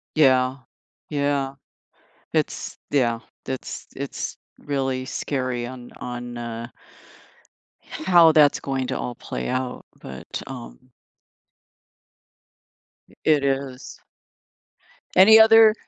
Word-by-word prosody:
Yeah. 130 -3 +4 0.5
Yeah. 140 -2 0 0.8
It's - - -2
yeah. 120 -5 +2 0.3
It's 130 -1 -6
it's 140 0 -5 0.2
really 135 -2 -2
scary, 130 -4 -2
on 125 -1 -10
on, 120 -1 -6
uh 115 0 -5 1.2
h - - -9
how 170 -3 +7
that's 150 -2 +5
going 135 -2 -2
to - - -2
all 120 - -5
play 60 0 -5
out, 130 -1 -3 0.2
but, 65 0 -7
um - - -10 2.2
i - - -21
it 150 -3 +3
is. 135 -1 -3 1.2
Any 220 +4 +9
other 220 -1 +8
130 Hz, 100 wpm, -23 LUFS, 125-145 Hz, 2.2 s, Any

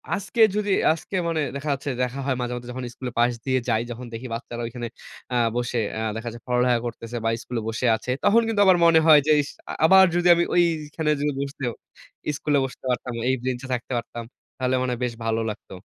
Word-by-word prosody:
আজকে 200 +4 -2
যদি, 205 -1 0 0.2
আজকে 165 +4 -7
মানে 165 -2 0
দেখা 140 +2 -4
যাচ্ছে, 140 +1 -4
দেখা 125 +2 -3
হয় 135 -2 +1
মাঝে, 125 0 -2
মাঝে 120 0 -8
যখন 130 0 -6
স্কুলের 125 -2 -7
পাশ 120 +1 +4
দিয়ে 130 -1 +2
যাই, 110 -1 +2
যখন 120 +1 -7
দেখি 115 +3 -6
বাচ্চারা 120 +1 -5
ঐখানে 120 0 -5 0.5
আ - - +2 0.2
বসে 120 0 -1 0.2
আ - - -2
দেখা 115 +1 -5
যাচ্ছে 120 - -11
পড়ালেখা 125 -1 +2
করতেছে 115 0 -5
বা - - +3
স্কুলে 120 -2 -4
বসে 115 +3 -2
আছে। 120 +3 -4
তখন 230 +3 +5
কিন্তু 215 -2 +1
আমার 185 -2 +6
মনে 165 -1 +6
হয় 155 -2 +9
যে, - - +5
"ইস! 145 - -7 0.4
আবার 190 +3 +8
যদি 175 0 +2
আমি 170 - +2
ঐখানে 160 -2 +1
যেয়ে 145 0 0
বসতে, 140 -1 -4 0.7
স্কুলে 145 -1 +1
বসতে 130 - -10
পারতাম, 125 0 -2 0.2
এই 130 - +3
বেঞ্চে 130 0 -3
থাকতে 125 +1 -4
পারতাম? 120 0 -5 0.3
তাহলে 130 0 0
মনে 130 - -1
হয় 120 0 -4
বেশ 120 - -3
ভালো 115 0 0
লাগতো।" 105 -2 -8
130 Hz, 210 wpm, -24 LUFS, 120-155 Hz, 0.7 s, হয়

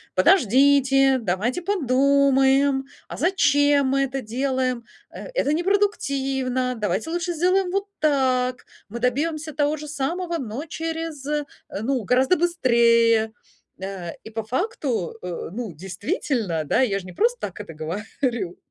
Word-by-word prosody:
"Подождите, 270 - +4
давайте 220 - -1
подумаем. 275 -4 +3 0.2
А - - -7
зачем 290 -6 +3
мы 275 +1 +2
это 270 0 -3
делаем? 255 +1 -1 0.3
Э, - - -9
это - - +1
непродуктивно. 275 -9 0
Давайте 210 - -2
лучше 345 +1 -2
сделаем 365 +3 +2
вот 395 +1 -1
так. 255 -4 +1 0.2
Мы 235 +3 -7
добьемся 305 +5 -1
того 295 +1 +1
же 300 -1 -8
самого, 335 +5 -2
но 245 +1 -5
через 325 -3 -5 0.6
ну, 255 0 -1
гораздо 260 - +3
быстрее". 235 -8 +3 0.5
Э, 190 -3 -5
и - - -9
по 225 0 -4
факту, 255 - -2
э, 175 -2 -5
ну 220 -2 -5
действительно, 190 - -2
да, 145 - +1
я 200 -6 +1
же 185 - -11
не 180 - -9
просто 485 +2 +1
так - - -5
это 165 - -8
говорю. 190 - -3
270 Hz, 130 wpm, -23 LUFS, 230-310 Hz, 0.6 s, Подождите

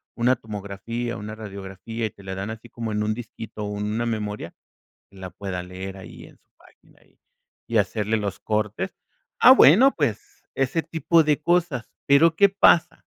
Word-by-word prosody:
una 125 +2 +3
tomografía, 110 +2 -5
una 110 +1 -7
radiografía, 100 +2 -6
y - - -2
te 100 - -18
la 95 0 -6
dan 95 +2 -4
así 110 +1 -9
como 115 -1 -5
en 105 0 -1
un 110 0 0
disquito, 110 -2 -8
o, 105 0 -4
en 105 - -3
una 115 +2 -1
memoria, 105 -6 -4 0.6
la 95 -2 -9
pueda 90 -2 -5
leer 95 +2 -8
ahí 95 - -11
en - - -16
su - - -43
página - - -24
ahí, - - -29 0.5
y 115 - +1
hacerle 105 +1 0
los 100 -3 -3
cortes. 105 -1 -2 0.5
Ah, - - +9
bueno, 240 - +7
pues 410 -1 -3
ese 135 +5 0
tipo 165 +1 +2
de 150 -1 +1
cosas, 170 -7 0 0.2
pero, 155 +4 +5
¿qué 200 - +6
pasa? 195 -4 +3
110 Hz, 180 wpm, -24 LUFS, 100-135 Hz, 0.6 s, Ah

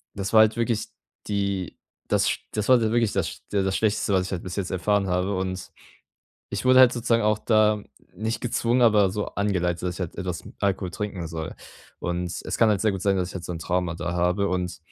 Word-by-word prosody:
das 100 0 -4
war 110 - +8
halt 110 +1 +3
wirklich 115 -2 0 0.4
die 100 -3 -2 0.3
das - - +2
sch - - -2
das 105 -1 -1
war 130 -1 +7
halt 110 - +1
wirklich 115 -2 +2
das 85 -5 -2
der 100 -1 +2
das 95 0 0
Schlechteste, 105 -2 +1
was 95 -1 +2
ich - - -8
halt 90 - -4
bis 90 -1 -6
jetzt 95 -2 -2
erfahren 100 +2 +1
habe. 90 +2 0
Und 95 0 -4 0.8
ich - - -3
wurde 130 0 +6
halt 125 -1 +7
sozusagen 115 -1 +1
auch 105 -1 +3
da 110 -2 +3 0.3
nicht 110 +4 -2
gezwungen, 120 +1 +1
aber 105 -4 +5
so 105 +1 -2
angeleitet, 90 -4 -1
dass 90 -1 -2
ich - - -10
halt 85 - -4
etwas 90 -2 -4 0.2
Alkohol 95 -2 0
trinken 95 -2 -4
soll. 80 -1 -5 0.5
Und 85 0 -2
es - - -3
kann 115 - +5
halt 105 -2 +2
sehr 110 - +3
gut 95 -2 -4
sein, 100 -1 +2
dass 90 -1 -1
ich - - -10
halt 90 - -5
so - - -5
'n 85 - -6
Trauma 90 0 -1
da 85 0 -3
habe. 90 +3 +1
Und 90 -1 -2
100 Hz, 230 wpm, -25 LUFS, 90-110 Hz, 0.8 s, war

